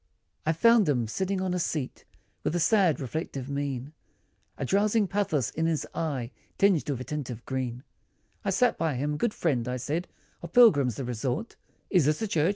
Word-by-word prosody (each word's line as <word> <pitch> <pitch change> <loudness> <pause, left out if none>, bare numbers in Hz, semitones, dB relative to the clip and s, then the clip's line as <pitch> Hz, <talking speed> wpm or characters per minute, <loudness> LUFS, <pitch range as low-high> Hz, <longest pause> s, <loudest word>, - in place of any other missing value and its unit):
I - - +5
FOUND 215 +2 +5
him, 120 -5 +1
sitting 190 - -1
on 185 -1 -1
a 180 - 0
seat, 150 -5 -3 0.4
With 175 - 0
sad 185 -3 +3
reflective 140 -1 -4
mien, 140 0 -3 0.6
A - - -2
drowsing 205 - +2
pathos, 170 - 0
in 160 +1 -1
his 160 -2 0
eye, 135 -7 -2 0.3
Tinged 195 -7 +3
with 130 -3 -2
a - - -3
tint 150 -2 -4
of 120 -1 -7
green, 130 -1 -3 0.6
I - - -1
sat 250 -2 +2
him 145 -2 0
by 150 - -2
"good 235 +7 +1
friend" 130 -9 0
I 125 0 -2
said, 150 +8 -2 0.3
"Of 170 -1 -9
pilgrims, 145 - +6
the 135 - -4
resort, 125 - -3 0.4
Is 180 -7 +4
this 150 +1 +2
a - - 0
church?" 165 -4 +2
150 Hz, 185 wpm, -28 LUFS, 130-185 Hz, 0.6 s, pilgrims